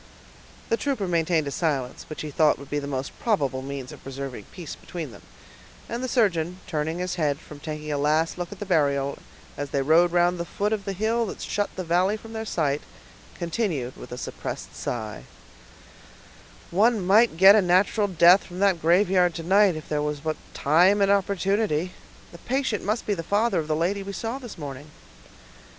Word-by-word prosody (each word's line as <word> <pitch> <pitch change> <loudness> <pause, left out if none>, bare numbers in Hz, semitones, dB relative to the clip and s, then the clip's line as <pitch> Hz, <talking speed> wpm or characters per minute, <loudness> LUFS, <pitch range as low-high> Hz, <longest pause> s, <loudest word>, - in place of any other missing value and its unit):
The 230 - +2
trooper 260 -9 -1
maintained 165 -2 +1
a 140 - -3
silence, 140 -6 -2
which 155 - -6
he 150 - -5
thought 155 +1 +3
would 140 0 -12
be 145 - 0
the 140 - -6
most 135 -1 -3
probable 140 - 0
means 135 -1 -6
of - - -12
preserving 135 -5 -7
peace 170 -5 -7
between 165 -7 -7
them; 100 - -13 0.7
and 235 +2 -4
the - - -1
surgeon, 180 -8 +1
turning 160 -1 -2
his 180 0 -2
head 145 -2 +1
from 150 - -12
taking 150 0 -5
a 145 - -1
last 155 +3 +1
look 175 -1 -4
at 205 - -8
the 205 - -5
burial, 140 -6 +1 0.4
as 145 0 -4
they 140 0 0
rode 165 +4 +4
around 175 +1 +3
the - - -1
foot 205 +5 -1
of 205 -3 -3
the 195 - -2
hill 225 +4 0
that - - -7
shut 205 0 -1
the 185 - -3
valley 180 +5 +2
from 225 +1 -12
their 220 0 -4
sight, 145 -6 0 0.6
continued 170 - -2
with 125 - -11
a 125 - -5
suppressed - - -6
sigh,— 110 -3 -4 1.5
"One 220 +5 +3
might 205 -1 +4
get 190 +3 +9
a 215 - +5
natural 190 +3 +3
death 180 +1 +6
from 180 - -10
that 190 -3 +2
graveyard 180 0 +3
to 165 - -5
night, 195 +1 +4
if 155 - -8
there 150 -1 -1
was 150 0 -2
but 155 0 -2 0.2
time 180 +8 +4
and 200 0 +4
opportunity! 195 -3 +1 0.4
The 170 - -12
patient 260 -3 -1
must 215 +4 -1
be 210 - +1
the 175 - -3
father 205 +6 +1
of 155 - -3
the 155 - +1
lady 180 +6 0
we 200 0 -6
saw 230 +6 -4
this 245 -5 -9
morning." 145 -1 -7
175 Hz, 200 wpm, -25 LUFS, 150-200 Hz, 1.5 s, get